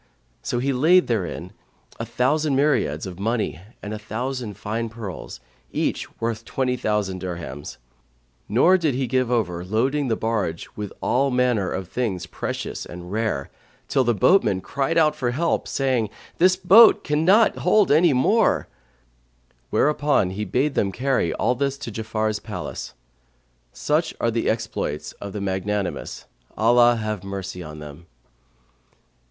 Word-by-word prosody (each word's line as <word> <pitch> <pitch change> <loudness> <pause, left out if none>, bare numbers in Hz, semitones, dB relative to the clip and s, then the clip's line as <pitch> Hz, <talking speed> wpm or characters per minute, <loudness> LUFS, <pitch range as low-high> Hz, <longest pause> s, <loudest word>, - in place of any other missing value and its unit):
So - - -2
he 135 +3 0
laid 170 +8 +5
therein 95 -4 -3 0.5
a 115 - -4
thousand 140 +5 +1
myriads 135 - +1
of 95 -1 -8
money 110 -4 -1 0.2
and 105 +1 -5
a 105 - -5
thousand 115 +1 -4
fine 115 +2 -3
pearls, 110 -5 -8 0.3
each - - -3
worth 115 -1 -2
twenty 125 +1 -1
thousand 105 -6 -1
dirhams; 85 -6 -6 0.7
nor 170 - +5
did 155 -6 0
he 130 +1 0
give 130 0 0
over 90 -8 0
loading 130 +9 0
the 115 - +1
barge 105 -8 -2
with 105 -2 -5
all 135 +2 +2
manner 125 -7 +1
of 95 -2 -4
things 95 -5 -2
precious - - -5
and 90 +1 -9
rare, 110 -10 -2 0.4
till 135 - +2
the 120 -2 +1
boatmen 105 - +4
cried 140 - -1
out 155 -2 +4
for 125 -4 -1
help, 160 +7 0
saying, 130 -6 0 0.3
"The 185 +2 +5
boat 220 +5 +8
can't 150 +4 +1 0.3
hold 210 -6 +3
any 160 +3 +5
more;" 170 - +2 1.0
whereupon 145 -10 +2
he 105 +3 -3
bade 135 +9 0
them 100 - +1
carry 125 -5 0
all 120 - +1
this 140 +2 -1
to 140 -4 -7
Ja'afar's 110 0 -2
palace. - - -6 0.8
Such 155 +3 -1
are 115 - +1
the 115 0 0
exploits 110 -9 -3
of 100 - -6
the 105 - -5
magnanimous, 95 0 -3 0.3
Allah 120 +2 +5
have 110 -3 -3
mercy 95 -2 -6
on 75 -2 -8
them! 75 +3 -11
115 Hz, 145 wpm, -23 LUFS, 100-135 Hz, 1.0 s, boat